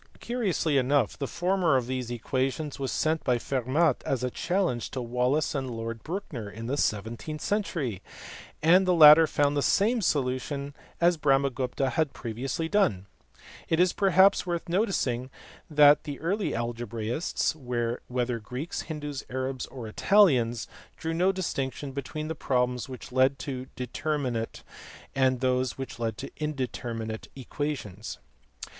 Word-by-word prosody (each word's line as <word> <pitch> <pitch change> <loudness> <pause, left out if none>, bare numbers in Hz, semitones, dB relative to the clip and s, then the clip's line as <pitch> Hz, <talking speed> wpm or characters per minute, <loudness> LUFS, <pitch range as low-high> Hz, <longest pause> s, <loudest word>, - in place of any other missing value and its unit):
Curiously 190 - 0
enough 135 +2 +2
the 140 - -3
former 180 -2 +1
of 125 - -1
these 130 -1 -3
equations 130 +5 -2
was 135 -1 -2
sent 160 0 0
by 125 -2 +2
Fermat 135 +5 +1
as 130 -2 -1
a 125 - -1
challenge 175 -9 -1
to 130 - -4
Wallis 125 +5 +1
and 135 -3 -2
Lord 115 -1 -5
Brouncker 155 - -5
in 115 +3 -8
the 130 +4 -1
seventeenth 120 +6 -2
century, 165 - -1 0.6
and 180 +4 +5
the 180 - +4
latter 155 0 +9
found 145 -1 +1
the 145 - +1
same 220 - +2
solutions 140 -2 -1 0.3
as 175 0 +4
Brahmagupta 135 -2 +1
had 155 +2 0
previously 130 +7 -3
done. 165 - +1 0.6
It 160 - +2
is 180 0 +4
perhaps 195 0 +4
worth 175 -2 -3
noticing 170 - 0 0.4
that 150 -1 +6
the 145 -2 -5
early 195 +5 -1
algebraists, 120 +5 -2 0.5
whether 125 -1 -1
Greeks, 125 +9 -5
Hindoos, 150 -3 -5
Arabs, 130 0 -3
or 125 -4 -8
Italians, 125 - +3 0.3
drew 165 0 -3
no 180 +4 +3
distinction 140 -7 -3
between 140 +3 -5
the 160 - -2
problems 125 -4 -1
which 130 -1 -9
led 130 +2 +3
to 130 -2 -5
determinate 125 -2 -3 0.5
and 130 -2 +2
those 130 -1 +1
which 135 -3 -6
led 115 -2 -2
to - - -7
indeterminate 120 -6 -4
equations. 130 -6 -5
135 Hz, 140 wpm, -28 LUFS, 125-160 Hz, 0.6 s, latter